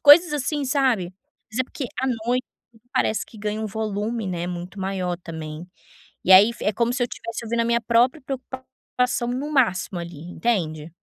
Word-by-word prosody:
coisas, 300 +2 +8
assim, 290 0 -1
sabe? 250 -10 +1 0.4
Mas 230 +4 -1
é, - - +5
porque 270 - -6 0.2
à 265 - 0
noite 245 +2 0 0.3
tudo 225 - -22
parece 220 -5 +1
que 220 - -15
ganha 210 +1 -2
um 220 - -2
volume, 215 +1 -2
né, 175 -2 -2
muito 180 +2 -6
maior 185 -2 -1
também, 160 -1 -7 0.6
e 190 - +6
aí, 200 +5 +9
fi - - -8
é 210 - +2
como 235 +3 +1
se 255 - 0
eu - - +3
tivesse 230 0 -6
ouvindo 230 +1 0
a - - +2
minha 235 0 +2
própria 245 +6 +3
preocupação 260 -2 -3
no 275 +5 -2
máximo, 190 -9 +2
ali, 170 -3 -7
entende? 165 -3 -2
225 Hz, 190 wpm, -24 LUFS, 185-255 Hz, 0.6 s, aí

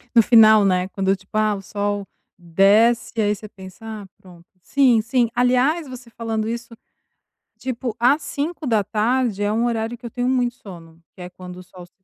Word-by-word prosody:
No 230 - +8
final, 220 -2 +6
né, 185 -1 +1
quando 195 0 0
tipo, 190 +3 -8
ah, 215 -1 +1
o 195 - -8
sol 205 0 -3 0.3
desce, 210 +7 +2
aí 210 0 +1
você 215 +2 -11
pensa: 190 +2 -13
"Ah, 215 -3 -8
pronto". 175 -3 -17 0.2
Sim, 250 +2 +3
sim. 235 +1 0
Aliás, 255 +6 +1
você 250 -2 -11
falando 225 -2 -4
isso, 235 0 -5 0.9
tipo, 245 -3 -4
às 270 +6 +3
17h 240 - -1
é 205 - 0
um 230 +2 0
horário 230 0 -2
que 240 - -15
eu 235 - -5
tenho 245 +2 -2
muito 250 -2 0
sono, 170 -8 -13 0.2
que 180 - -13
é 180 - -8
quando 180 0 -11
o 185 - -11
sol 180 0 -14
se 185 +2 -32
220 Hz, 185 wpm, -21 LUFS, 195-240 Hz, 0.9 s, No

